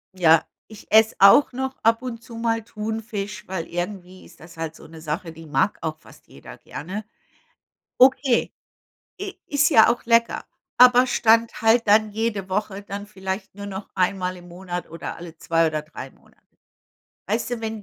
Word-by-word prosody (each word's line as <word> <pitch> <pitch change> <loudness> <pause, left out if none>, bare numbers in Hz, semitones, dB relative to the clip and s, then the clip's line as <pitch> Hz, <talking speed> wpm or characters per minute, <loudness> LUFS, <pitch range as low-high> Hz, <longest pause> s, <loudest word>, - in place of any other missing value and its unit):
Ja, 165 -3 +4 0.2
ich 215 -1 -15
esse 220 0 +5
auch 200 +9 +7
noch 265 +1 -3
ab 225 +2 +2
und 235 -2 -6
zu 230 - -11
mal 230 -1 -1
Thunfisch, 210 -1 -5
weil 185 -3 -4
irgendwie 180 +1 -6
ist - - -18
das 165 +1 -15
halt 165 -1 -5
so - - -15
'ne 160 0 -13
Sache, 165 +2 -4
die 160 0 -13
mag 150 +7 0
auch 155 -1 -3
fast - - -19
jeder - - -13
gerne. 185 +9 -7 1.0
Okay, 260 -1 +4 0.7
i 400 0 -5
ist 295 +1 +2
ja 225 -7 +7
auch 245 - -8
lecker. 230 0 +2 0.3
Aber 250 0 +7
Stand 230 -2 +2
halt 225 0 +3
dann 215 +1 +4
jede 210 -3 -2
Woche, 200 +1 -3
dann 200 0 -7
vielleicht 190 -1 -6
nur 200 0 -7
noch 195 0 -7
einmal 185 0 0
im 175 0 -14
Monat, 180 0 -6
oder 165 +1 -7
alle 170 -1 -11
2 165 0 +1
oder 155 -1 -2
3 155 +2 -10
Monate. - - -26 0.9
Weißt - - -2
du, 240 -2 -3
wenn 220 -1 -5
205 Hz, 175 wpm, -23 LUFS, 175-230 Hz, 1.0 s, auch